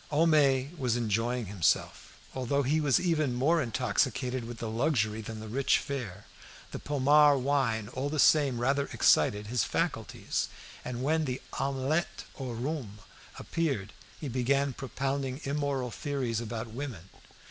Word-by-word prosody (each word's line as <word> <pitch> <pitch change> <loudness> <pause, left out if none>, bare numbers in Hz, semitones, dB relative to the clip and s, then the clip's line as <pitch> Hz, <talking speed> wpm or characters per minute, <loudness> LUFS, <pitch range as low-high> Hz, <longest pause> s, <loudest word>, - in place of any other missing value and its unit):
Homais 145 -3 +3
was 125 -3 +1
enjoying 115 +1 0
himself. 95 -4 -1 0.2
Although 130 +2 0
he 150 +4 +1
was 140 -5 +3
even 155 -8 +1
more 155 +7 +3
intoxicated 125 0 0
with 120 0 -7
the 115 - -4
luxury 110 -2 0
than 110 0 -7
the 110 - -8
rich 135 +5 +2
fare, 110 -9 -5 0.5
the - - -5
Pommard 145 0 +4
wine 125 -6 +1
all 135 +2 -3
the 155 - -3
same 140 -3 +4
rather 140 +3 +1
excited 105 +7 +3
his 120 +1 0
faculties; - - -2 0.3
and 125 0 -4
when 160 +2 +1
the 130 -2 -3 0.2
omelette 135 +5 -1 0.2
au 130 -2 -4
rhum 120 -3 -4 0.4
appeared, 135 -12 -2 0.3
he 150 - -5
began 135 +2 +1
propounding 135 +1 -3
immoral 140 -3 -1
theories 130 -5 -2
about 115 0 -4
women. 115 -7 -6
130 Hz, 140 wpm, -29 LUFS, 115-140 Hz, 0.5 s, Pommard